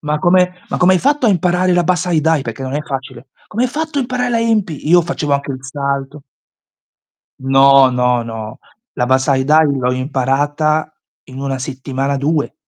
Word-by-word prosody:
ma 150 Hz, 0 st, -2 dB
come 180 Hz, +2 st, +3 dB, 0.2 s
ma -, -, -3 dB
come 180 Hz, +1 st, +4 dB
hai -, -, +3 dB
fatto 285 Hz, +3 st, +1 dB
a -, -, +4 dB
imparare 180 Hz, 0 st, +1 dB
la 175 Hz, 0 st, +3 dB
Bassai 175 Hz, -1 st, +1 dB
Dai?" 160 Hz, -2 st, +1 dB
Perché 115 Hz, +2 st, -7 dB
non 130 Hz, +1 st, -4 dB
è 150 Hz, -, -2 dB
facile. 135 Hz, -2 st, -7 dB, 0.2 s
"Come 235 Hz, +4 st, -1 dB
hai -, -, 0 dB
fatto 310 Hz, 0 st, -3 dB
a -, -, +2 dB
imparare 250 Hz, 0 st, -2 dB
la 230 Hz, -1 st, +1 dB
Enpi?" 210 Hz, -11 st, -1 dB
Io 175 Hz, +2 st, +6 dB
facevo 160 Hz, -3 st, -3 dB
anche 140 Hz, 0 st, -1 dB
il 130 Hz, -, -6 dB
salto 140 Hz, +1 st, -4 dB, 1.2 s
No, 135 Hz, 0 st, +5 dB
no, 125 Hz, -1 st, +1 dB
no, 110 Hz, -1 st, -8 dB, 0.3 s
la 125 Hz, -, 0 dB
Bassai 130 Hz, +1 st, +1 dB
Dai 155 Hz, +1 st, +4 dB
l'ho 125 Hz, -2 st, -1 dB
imparata 145 Hz, +4 st, -1 dB, 0.3 s
in 130 Hz, +1 st, -10 dB
1 135 Hz, -1 st, -3 dB
settimana, 135 Hz, +1 st, -3 dB
2. 145 Hz, +2 st, -1 dB
145 Hz, 185 wpm, -16 LUFS, 135-175 Hz, 1.2 s, Io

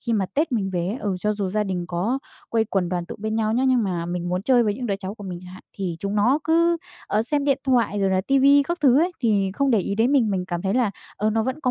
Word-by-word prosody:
khi 235 Hz, -, -2 dB
mà 200 Hz, -4 st, +1 dB
Tết 300 Hz, 0 st, 0 dB
mình 200 Hz, -5 st, 0 dB
về 175 Hz, -2 st, -1 dB
ấy, 210 Hz, -, -2 dB
ừ, 200 Hz, -7 st, -2 dB
cho 210 Hz, +2 st, +1 dB
dù 200 Hz, -3 st, -3 dB
gia 210 Hz, +2 st, 0 dB
đình 185 Hz, -3 st, -3 dB
có 190 Hz, +10 st, -1 dB, 0.3 s
quây 225 Hz, -1 st, +2 dB
quần 195 Hz, -4 st, -1 dB
đoàn 175 Hz, -1 st, -3 dB
tụ -, -, -7 dB
bên 215 Hz, +1 st, -3 dB
nhau 220 Hz, -1 st, 0 dB
nhé, 250 Hz, +3 st, +1 dB
nhưng 255 Hz, -2 st, +3 dB
mà 175 Hz, -4 st, -2 dB
mình 175 Hz, 0 st, -3 dB
muốn 180 Hz, +1 st, -1 dB
chơi 245 Hz, +2 st, +4 dB
với 210 Hz, -3 st, 0 dB
những 245 Hz, +2 st, -5 dB
đứa 200 Hz, -3 st, -1 dB
cháu 195 Hz, 0 st, -6 dB
của 205 Hz, -, -11 dB
mình 180 Hz, -2 st, -5 dB
chẳng 180 Hz, 0 st, -11 dB
hạn, 185 Hz, -, -12 dB
thì 185 Hz, -4 st, -4 dB
chúng 200 Hz, +2 st, -3 dB
nó 235 Hz, +7 st, +3 dB
cứ, 335 Hz, +1 st, +3 dB, 0.3 s
ờ, 215 Hz, -, +1 dB
xem 285 Hz, +4 st, 0 dB
điện 280 Hz, -1 st, +2 dB
thoại 235 Hz, -6 st, +1 dB
rồi 195 Hz, -1 st, +2 dB
là 185 Hz, 0 st, +2 dB
ti 275 Hz, +8 st, +1 dB
vi 280 Hz, +1 st, +6 dB
các 345 Hz, +5 st, -3 dB
thứ 270 Hz, -3 st, +5 dB
ấy, 355 Hz, +3 st, +1 dB
thì 205 Hz, -5 st, +1 dB
không 275 Hz, +2 st, +1 dB
để 230 Hz, -, +4 dB
ý 200 Hz, +1 st, -2 dB
đến 230 Hz, +6 st, +2 dB
mình. 245 Hz, -7 st, +3 dB
Mình 185 Hz, -2 st, -1 dB
cảm 175 Hz, -2 st, -3 dB
thấy 195 Hz, +1 st, 0 dB
là, 245 Hz, -4 st, +2 dB, 0.3 s
ờ, 215 Hz, +1 st, 0 dB
nó 220 Hz, +1 st, +1 dB
vẫn 260 Hz, +6 st, -3 dB
có 255 Hz, -, +1 dB
215 Hz, 315 wpm, -23 LUFS, 190-255 Hz, 0.3 s, vi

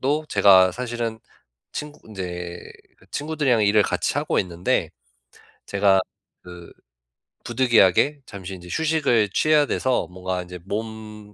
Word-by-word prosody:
또 145 Hz, +4 st, 0 dB
제가 95 Hz, -2 st, +5 dB
사실은 120 Hz, -1 st, -4 dB, 0.5 s
친구 150 Hz, 0 st, -7 dB
이제 90 Hz, -3 st, -6 dB, 0.5 s
친구들이랑 145 Hz, -7 st, 0 dB
일을 105 Hz, +1 st, +4 dB
같이 -, -, -1 dB
하고 -, -, 0 dB
있는데 90 Hz, -1 st, -1 dB, 0.8 s
제가 100 Hz, -1 st, +3 dB, 0.4 s
그 90 Hz, -1 st, -12 dB, 0.7 s
부득이하게 120 Hz, +3 st, +3 dB
잠시 95 Hz, -2 st, -8 dB
인제 90 Hz, -1 st, -12 dB
휴식을 150 Hz, -9 st, +1 dB
취해야 155 Hz, -1 st, +3 dB
돼서 130 Hz, -9 st, 0 dB
뭔가 90 Hz, 0 st, -4 dB
이제 90 Hz, 0 st, -10 dB
몸 105 Hz, 0 st, -7 dB
105 Hz, 260 characters per minute, -23 LUFS, 95-125 Hz, 0.8 s, 제가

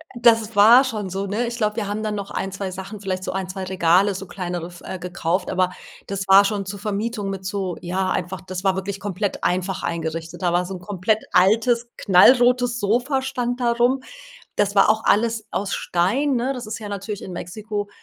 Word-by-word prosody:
Das 225 Hz, -2 st, +3 dB
war 230 Hz, +6 st, +8 dB
schon 215 Hz, -7 st, -3 dB
so, 195 Hz, +1 st, -3 dB
ne? 220 Hz, +5 st, -1 dB
Ich 235 Hz, 0 st, -4 dB
glaube, 210 Hz, -2 st, 0 dB
wir 220 Hz, -3 st, -2 dB
haben 210 Hz, +1 st, -3 dB
dann 215 Hz, -1 st, -2 dB
noch 200 Hz, -1 st, -5 dB
1, 195 Hz, -, -3 dB
2 195 Hz, -1 st, -4 dB
Sachen, 195 Hz, +2 st, -7 dB
vielleicht 185 Hz, -2 st, -3 dB
so -, -, -3 dB
1, 190 Hz, -1 st, -3 dB
2 190 Hz, +1 st, -5 dB
Regale, 185 Hz, +2 st, +3 dB
so 195 Hz, -, -6 dB
kleinere 175 Hz, -2 st, -5 dB
f 175 Hz, -1 st, -13 dB
äh, 190 Hz, -, -5 dB
gekauft, 180 Hz, 0 st, -2 dB
aber 185 Hz, 0 st, +1 dB, 0.4 s
das 195 Hz, -1 st, -4 dB
war 195 Hz, +1 st, +8 dB
schon 200 Hz, -1 st, -1 dB
zur 200 Hz, +1 st, -6 dB
Vermietung 210 Hz, 0 st, -3 dB
mit 190 Hz, -1 st, -5 dB
so 190 Hz, -3 st, -3 dB
ja, 185 Hz, +2 st, -1 dB
einfach 185 Hz, 0 st, -3 dB
das 185 Hz, 0 st, -6 dB
war 190 Hz, -1 st, +2 dB
wirklich 195 Hz, +1 st, -4 dB
komplett 200 Hz, 0 st, -3 dB
einfach 185 Hz, +1 st, -1 dB
eingerichtet. 165 Hz, +1 st, -4 dB
Da 175 Hz, -1 st, +1 dB
war 175 Hz, +1 st, +1 dB
so 190 Hz, -, -6 dB
'n 180 Hz, -, -8 dB
komplett 205 Hz, +3 st, -1 dB
altes, 230 Hz, +5 st, +3 dB
knallrotes 245 Hz, +5 st, +5 dB
Sofa 245 Hz, +6 st, +1 dB
stand 245 Hz, -1 st, -2 dB
da 235 Hz, -1 st, +2 dB
rum. 245 Hz, +3 st, +2 dB, 0.5 s
Das 205 Hz, 0 st, +1 dB
war 195 Hz, -, +6 dB
auch 220 Hz, 0 st, -3 dB
alles 225 Hz, 0 st, +2 dB
aus 200 Hz, 0 st, -2 dB
Stein, 245 Hz, +12 st, +1 dB
ne? 250 Hz, +3 st, 0 dB
Das 245 Hz, -4 st, -7 dB
ist 215 Hz, -, -4 dB
ja 215 Hz, -2 st, -7 dB
natürlich 200 Hz, 0 st, -5 dB
in 185 Hz, -, -7 dB
Mexiko 205 Hz, +4 st, -5 dB
200 Hz, 215 wpm, -22 LUFS, 185-225 Hz, 0.5 s, war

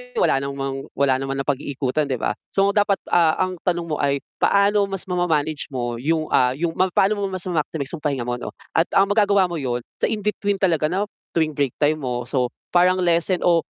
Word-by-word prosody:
wala 135 Hz, -, +3 dB
namang 135 Hz, 0 st, -4 dB
wala 135 Hz, -1 st, +2 dB
naman 135 Hz, 0 st, -3 dB
napag-iikutan 140 Hz, +1 st, -1 dB
'di 130 Hz, -, -1 dB
ba. -, -, +1 dB, 0.2 s
So 195 Hz, 0 st, +4 dB
dapat, 205 Hz, -1 st, +2 dB
ah, 165 Hz, -2 st, +4 dB
ang 185 Hz, -1 st, -1 dB
tanong 175 Hz, -2 st, -1 dB
mo 150 Hz, -, 0 dB
ay 140 Hz, -1 st, 0 dB, 0.2 s
paano 200 Hz, 0 st, +3 dB
mas 195 Hz, -2 st, -3 dB
mama-manage 160 Hz, -4 st, 0 dB
mo 120 Hz, -2 st, -2 dB
'yung, 155 Hz, +4 st, -1 dB
ah, 125 Hz, 0 st, +3 dB
'yung 165 Hz, +3 st, -3 dB
ma 185 Hz, -, +3 dB
paano 205 Hz, +2 st, +3 dB
mo 200 Hz, -, -1 dB
mas 185 Hz, -2 st, -4 dB
ma-maximize 155 Hz, -4 st, -2 dB
'yung 170 Hz, -, -5 dB
pahinga 135 Hz, -4 st, 0 dB
mo 120 Hz, 0 st, -2 dB
'no -, -, -7 dB, 0.2 s
at 165 Hz, -, +4 dB
ang 195 Hz, 0 st, +4 dB
magagawa 200 Hz, -3 st, +3 dB
mo 170 Hz, -, -3 dB
'yun 125 Hz, -4 st, -2 dB, 0.2 s
sa -, -, +1 dB
in 215 Hz, -2 st, -2 dB
between 205 Hz, -1 st, -1 dB
talaga 165 Hz, -5 st, +2 dB
na 190 Hz, +5 st, 0 dB, 0.3 s
tuwing 160 Hz, -2 st, +1 dB
break 140 Hz, -4 st, +1 dB
time 155 Hz, +1 st, +2 dB
mo, 125 Hz, -1 st, -2 dB
so 125 Hz, -3 st, 0 dB, 0.2 s
parang 185 Hz, +1 st, +4 dB
lesson 170 Hz, +1 st, +1 dB
o 170 Hz, -2 st, +3 dB
165 Hz, 210 wpm, -22 LUFS, 140-185 Hz, 0.3 s, So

